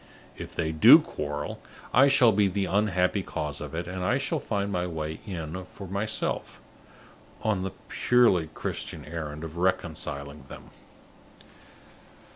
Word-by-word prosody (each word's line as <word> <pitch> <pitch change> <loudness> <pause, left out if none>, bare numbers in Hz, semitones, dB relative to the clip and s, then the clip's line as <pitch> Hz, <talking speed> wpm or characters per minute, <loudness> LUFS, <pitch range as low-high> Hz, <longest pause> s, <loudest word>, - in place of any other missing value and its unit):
If - - -9
they 80 -1 -1
do 80 -1 +9
quarrel, 75 0 -5 0.3
I 135 +3 +7
shall 135 -4 +6
be 105 -1 +3
the 95 +1 -1
unhappy 95 -1 +1
cause 75 -5 -4
of - - -6
it, 85 +1 -3
and 90 +1 -5
I 120 +8 +2
shall 140 +3 -1
find 100 -5 -2
my 90 -1 -1
way 80 -2 -4
in 85 -1 -5
for 100 +1 -10
myself, 100 +4 -2 0.8
on 105 -4 +1
the 95 0 -4
purely 115 -10 +3
Christian - - -4
errand 75 -1 -6
of 80 0 -7
reconciling 75 -6 -2
them." - - -12
90 Hz, 140 wpm, -27 LUFS, 80-100 Hz, 0.8 s, do